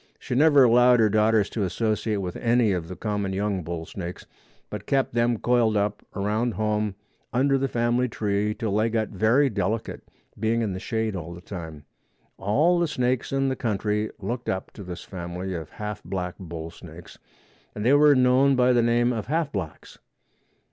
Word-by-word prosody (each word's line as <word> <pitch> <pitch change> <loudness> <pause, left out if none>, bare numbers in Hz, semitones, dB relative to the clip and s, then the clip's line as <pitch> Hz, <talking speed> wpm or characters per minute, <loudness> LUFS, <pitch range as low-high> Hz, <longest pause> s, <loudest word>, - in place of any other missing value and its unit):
She - - -6
never 145 +1 +6
allowed 125 0 +5
her 110 -2 +4
daughters 110 -1 +3
to 110 - -3
associate 105 +1 -1
with 90 -2 -4
any 120 -2 +2
of 90 -3 -2
the 90 - -7
common 105 -2 -2
young 100 -1 -1
bull 85 0 -5
snakes, 90 -1 -7 0.5
but 105 -1 -6
kept 135 -3 +1
them 120 0 +2
coiled 115 -2 +2
up 105 0 -1
around 105 +4 -1
home 105 -2 -1 0.4
under 135 +2 +2
the 135 0 +1
family 120 0 +1
tree 105 -1 -1
till 110 -3 -2
they 110 +2 +2
got 110 -1 -1
very 115 +8 +3
delicate, 110 -1 -2 0.4
being 115 +2 +1
in 105 -4 -2
the 95 - -5
shade 110 0 -2
all 85 -1 -6
the - - -10
time. 80 -5 -8 0.5
All 150 - +2
the 170 - +2
snakes 125 -3 -1
in 135 0 +1
the 130 - -1
country 105 -2 -1
looked 120 +1 -4
up 95 - -3
to 100 - -10
this 90 -1 -7
family 90 0 -6
of 80 -3 -6
half 105 0 -6
black 90 -2 -4
bull 85 -3 -7
snakes 85 0 -13 0.6
and 105 - -4
they 130 - +5
were 145 0 +6
known 130 +2 +4
by 125 0 +4
the 120 - +4
name 120 +1 +2
of 110 -3 -4
Half 155 +1 0
Blacks. 90 -7 -6
110 Hz, 185 wpm, -25 LUFS, 95-120 Hz, 0.6 s, never